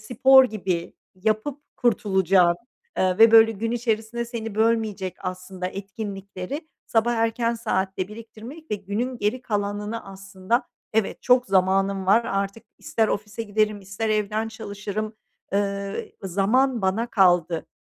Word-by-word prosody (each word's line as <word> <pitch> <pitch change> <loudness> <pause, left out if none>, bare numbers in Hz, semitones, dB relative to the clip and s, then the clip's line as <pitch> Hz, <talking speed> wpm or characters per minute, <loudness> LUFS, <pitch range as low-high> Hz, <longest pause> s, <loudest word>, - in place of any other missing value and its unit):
spor 265 +3 +6
gibi 190 -7 -3 0.2
yapıp 215 +9 -1 0.2
kurtulacağın, 190 -6 +3 0.4
eee, 185 -1 +2
ve 225 0 +8
böyle 225 0 +7
gün 225 +2 -3
içerisinde 235 0 -1
seni 225 -3 -6
bölmeyecek 220 -4 0
aslında 185 0 -5
etkinlikleri 195 - -6 0.2
sabah 235 +1 +2
erken 230 +1 +1
saatte 190 -4 -2
biriktirmek 230 +7 -11
ve - - +1
günün 210 +6 -3
geri 230 +5 -1
kalanını 205 0 -3
aslında, 195 +5 -3 0.3
"Evet, 220 -2 0
çok 250 0 +4
zamanım 195 0 +2
var 225 +4 +5
artık, 195 +2 -2
ister 220 -1 0
ofise 210 +2 -3
giderim 215 -1 0
ister 195 +3 -4
evden 215 +1 0
çalışırım, 215 0 -5 0.4
ııı, 200 0 -1 0.3
zaman 215 +6 +1
bana 205 +5 +1
kaldı." 175 -6 +3
210 Hz, 125 wpm, -24 LUFS, 195-230 Hz, 0.4 s, ve